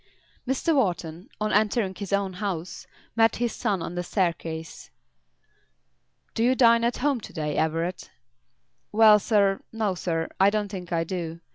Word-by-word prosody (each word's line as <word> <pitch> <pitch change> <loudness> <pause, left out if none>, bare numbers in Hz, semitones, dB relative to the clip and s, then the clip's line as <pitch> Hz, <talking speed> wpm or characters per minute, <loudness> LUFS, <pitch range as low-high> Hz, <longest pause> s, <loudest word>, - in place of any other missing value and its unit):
Mr. 270 +5 +1
Wharton, 180 - -1
on 215 0 -1
entering 210 -1 +1
his 200 0 -7
own 200 -1 0
house, 180 -3 -5 0.3
met 225 -1 +4
his 240 -1 -1
son 190 -5 -1
on - - -5
the 175 - -2
staircase. 165 -3 -3 1.4
"Do 225 - 0
you 255 +2 +3
dine 235 -2 +5
at 235 +1 0
home 275 -3 0
to - - -10
day, 150 -2 -3
Everett?" 165 +3 -1 0.8
"Well, 215 -1 +7
sir; 200 -2 +2
no, 220 -3 -1
sir. 165 -2 -2
I 195 +1 +6
don't 210 -1 -1
think 180 -3 -7
I 165 -1 +1
do. 170 -2 -5
195 Hz, 155 wpm, -25 LUFS, 170-220 Hz, 1.4 s, Well